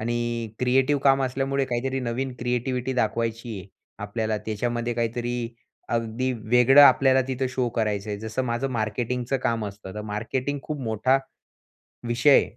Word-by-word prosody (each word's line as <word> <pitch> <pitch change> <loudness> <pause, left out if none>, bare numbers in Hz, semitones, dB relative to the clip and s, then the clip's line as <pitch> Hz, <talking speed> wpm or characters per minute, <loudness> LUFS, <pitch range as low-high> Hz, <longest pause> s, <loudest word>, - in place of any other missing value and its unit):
आणि 120 0 -2
क्रिएटिव्ह 130 +3 +2
काम 135 0 +5
असल्यामुळे, 135 +1 0
काहीतरी 130 +2 -2
नवीन 125 +1 -3
क्रिएटीव्हीटी 125 +1 -1
दाखवायची 115 -1 -1
आहे 95 +1 -11 0.3
आपल्याला, 110 +1 -2
त्याच्यामध्ये 120 +2 -2
काहीतरी 120 0 -2 0.4
अगदी 115 +2 -1
वेगळं 125 +4 +5
आपल्याला 130 -1 +6
तिथं 130 0 -1
शो 130 -1 0
करायचं 105 -2 -1
आहे. 100 - -3
जसं 110 +4 -2
माझं 120 +2 -1
मार्केटिंगचं 120 +3 -1
काम 115 -2 0
असतं. 100 -1 -9
तर 105 - -4
मार्केटिंग 130 +7 -3
खूप 150 -2 -5
मोठा 115 +4 +2 0.9
विषय, 125 +4 +5
120 Hz, 140 wpm, -25 LUFS, 115-130 Hz, 0.9 s, आपल्याला